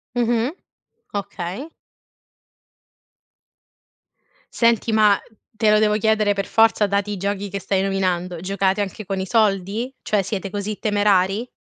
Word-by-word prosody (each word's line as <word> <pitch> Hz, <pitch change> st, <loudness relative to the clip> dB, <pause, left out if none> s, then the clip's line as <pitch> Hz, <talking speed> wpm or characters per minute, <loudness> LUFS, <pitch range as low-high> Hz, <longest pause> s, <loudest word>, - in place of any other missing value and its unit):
Mh-mh, 240 Hz, +1 st, +1 dB, 0.6 s
okay. 200 Hz, -, -5 dB, 2.8 s
Senti 230 Hz, -1 st, +2 dB
ma, 210 Hz, -2 st, +5 dB, 0.3 s
te 215 Hz, -2 st, +1 dB
lo 215 Hz, -, +5 dB
devo 210 Hz, -1 st, +3 dB
chiedere 215 Hz, -1 st, +2 dB
per 195 Hz, 0 st, -2 dB
forza, 225 Hz, -2 st, +3 dB
dati 200 Hz, +1 st, -1 dB
i -, -, -2 dB
giochi 200 Hz, +1 st, -2 dB
che 200 Hz, 0 st, -5 dB
stai 190 Hz, +1 st, 0 dB
nominando, 185 Hz, -3 st, -1 dB
giocate 195 Hz, +1 st, 0 dB
anche 200 Hz, +1 st, -5 dB
con 195 Hz, 0 st, -3 dB
i 190 Hz, -, -3 dB
soldi? 210 Hz, +2 st, +1 dB
Cioè 210 Hz, -2 st, 0 dB
siete 195 Hz, 0 st, -4 dB
così 205 Hz, +1 st, -4 dB
temerari? 205 Hz, +1 st, +1 dB
205 Hz, 130 wpm, -21 LUFS, 195-220 Hz, 2.8 s, ma